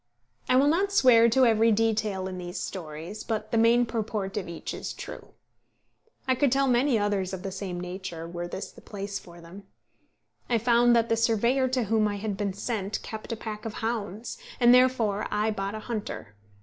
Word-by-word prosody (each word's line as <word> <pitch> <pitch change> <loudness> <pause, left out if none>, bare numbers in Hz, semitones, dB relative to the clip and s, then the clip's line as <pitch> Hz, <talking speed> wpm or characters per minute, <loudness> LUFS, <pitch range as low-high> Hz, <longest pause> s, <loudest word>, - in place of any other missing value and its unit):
I 255 - +4
will 270 +2 +5
not 380 +6 +2
swear 240 -11 +6
to 260 +3 +4
every 225 0 +4
detail 215 -3 0
in 185 -1 -6
these 175 0 -6
stories, 170 +3 -6
but 215 -1 -3
the 230 - +1
main 235 +2 +5
purport 215 -4 -3
of 195 -4 -3
each 170 - -6
is - - -5
true. - - -10 0.9
I 260 - +4
could 265 0 +2
tell 275 +1 +3
many 250 0 +3
others 205 -3 -1
of 185 -1 -5
the 195 - -4
same 190 -2 -5
nature, 180 -2 -6
were 175 0 -5
this 190 +2 -6
the - - -16
place 200 -1 -5
for 170 0 -14
them. 190 +4 -12 0.8
I 240 - +3
found 235 +1 +4
that 230 0 +2
the 230 - +3
surveyor 235 +3 +2
to 255 -1 0
whom 220 0 +2
I 205 - -2
had 205 0 -3
been 200 -1 -2
sent 200 0 -3
kept 220 +1 -7
a - - -1
pack 215 -1 -7
of 225 - -5
hounds, 225 - -4 0.2
and 240 -1 +7
therefore 245 -5 +3
I 210 +1 0
bought 200 0 -3
a - - -4
hunter. 210 - -5
215 Hz, 200 wpm, -27 LUFS, 195-235 Hz, 0.9 s, and